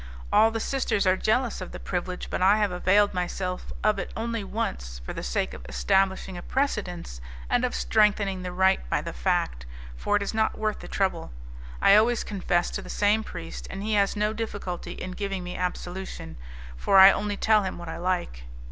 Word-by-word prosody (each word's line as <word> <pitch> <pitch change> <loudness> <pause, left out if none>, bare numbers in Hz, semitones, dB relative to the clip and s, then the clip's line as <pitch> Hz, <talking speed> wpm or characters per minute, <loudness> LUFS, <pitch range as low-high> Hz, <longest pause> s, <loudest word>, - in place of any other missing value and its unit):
All 220 - +6
the 225 0 -3
sisters 225 -5 0
are 185 0 +4
jealous 225 +2 0
of 185 - -6
the - - -8
privilege, 180 0 -4
but - - -2
I 195 +3 +5
have 210 -3 +1
availed 190 +3 +3
myself 180 0 -3
of 215 -2 +2
it 195 - -5
only 230 -1 -2
once, 60 - -4
for - - -5
the - - -5
sake - - -1
of - - -9
establishing 190 - +1
a - - -8
precedent 180 - -2 0.3
and - - +3
of - - 0
strengthening 195 - +2
the 180 0 -4
right 190 +1 +3
by - - +1
the - - -5
fact, - - -1 0.3
for 205 - 0
it 205 - +2
is 200 - -3
not 220 0 +1
worth 215 -1 -1
the - - -9
trouble. 190 - -1 0.5
I 195 - +8
always 230 +2 +3
confess 180 -4 0
to - - -3
the - - -11
same 210 +2 +2
priest, 80 - -8
and 195 - -6
he 215 +1 -1
has 200 -1 +2
no 210 +1 0
difficulty 205 -5 -5
in 185 - -6
giving 195 0 -3
me 180 0 -6
absolution, 180 - -5 0.4
for 130 - +2
I 190 +1 +11
only 205 0 -2
tell 220 -1 +4
him 190 -2 -4
what 170 -1 -8
I 160 - -5
like." 170 - -2
190 Hz, 200 wpm, -26 LUFS, 180-210 Hz, 0.5 s, I